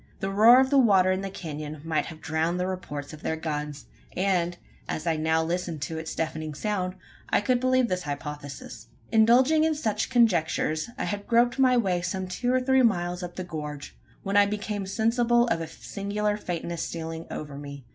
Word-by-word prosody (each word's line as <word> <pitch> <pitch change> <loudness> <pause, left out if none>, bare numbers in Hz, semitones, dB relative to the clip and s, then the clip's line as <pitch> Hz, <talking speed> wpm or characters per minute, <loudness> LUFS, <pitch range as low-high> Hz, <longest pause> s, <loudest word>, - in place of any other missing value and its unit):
The 195 - -2
roar 225 +5 +7
of 265 +1 +2
the 280 - +6
water 195 -6 +5
in 185 0 0
the 195 - -4
canon 155 -4 -6
might 160 -1 -1
have 160 -2 -10
drowned 160 +3 -1
the 180 - 0
reports 150 -6 -5
of 155 - -10
their 160 - -1
guns; 150 -2 -4 0.3
and, 180 -2 +1 0.3
as 155 - -3
I 165 -1 +1
now 160 +1 +1
listened 170 -3 -3
to 160 +3 -4
its 160 - -6
deafening 155 -1 -3
sound, 185 0 -2 0.3
I - - +3
could 245 +4 +1
believe 255 0 +3
in - - +1
this 180 0 -1
hypothesis. 145 -2 -7 0.2
Indulging 255 +8 +5
in 320 -1 +2
such 250 -9 -1
conjectures, 175 -8 +2
I - - -2
had 205 0 -4
groped 240 +2 +3
my 255 -1 +5
way 185 -6 +1
some 185 +1 -3
two 245 +7 -1
or 255 - +3
three 265 +1 +3
miles 180 -6 +1
up 175 -1 -6
the 185 - -4
gorge, 150 -4 -6 0.3
when 200 +1 0
I 205 0 +6
became 205 -1 -3
sensible 235 +3 +2
of 165 - 0
a 165 - -4
singular 205 +5 -3
faintness 170 -4 -4
stealing 165 0 -5
over 150 -2 -6
me. 140 -2 -9
180 Hz, 195 wpm, -26 LUFS, 160-220 Hz, 0.3 s, roar